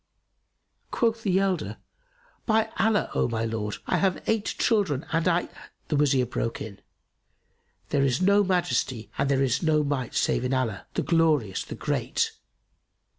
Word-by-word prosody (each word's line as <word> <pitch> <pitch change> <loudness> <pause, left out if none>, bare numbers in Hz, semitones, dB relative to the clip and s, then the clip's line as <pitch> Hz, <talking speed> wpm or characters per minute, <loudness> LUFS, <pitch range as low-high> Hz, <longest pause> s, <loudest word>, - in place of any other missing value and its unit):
Quoth 230 -1 0
the 190 -4 +1
elder, 195 -2 0 0.7
"By 220 -1 +2
Allah, 220 -1 +2
O - - +1
my 115 -1 -2
lord, 110 -2 -3
I - - +1
have 190 -2 0
eight 220 -2 +1
children 190 - +1
and 165 +1 +1
I"— 175 0 +2 0.4
The 150 - +1
Wazir 140 -3 +3
broke 115 -1 -3
in, 100 -2 -8 1.1
"There 140 - +1
is 130 -1 +1
no 200 +2 +4
Majesty 130 - -1
and 140 0 +1
there 135 -1 +2
is 130 0 +1
no 155 -2 +2
Might 140 -4 -2
save - - +1
in 130 +1 0
Allah, 115 -7 -2
the - - 0
Glorious, 155 - +2
the - - -8
Great! - - -1
150 Hz, 155 wpm, -26 LUFS, 125-190 Hz, 1.1 s, no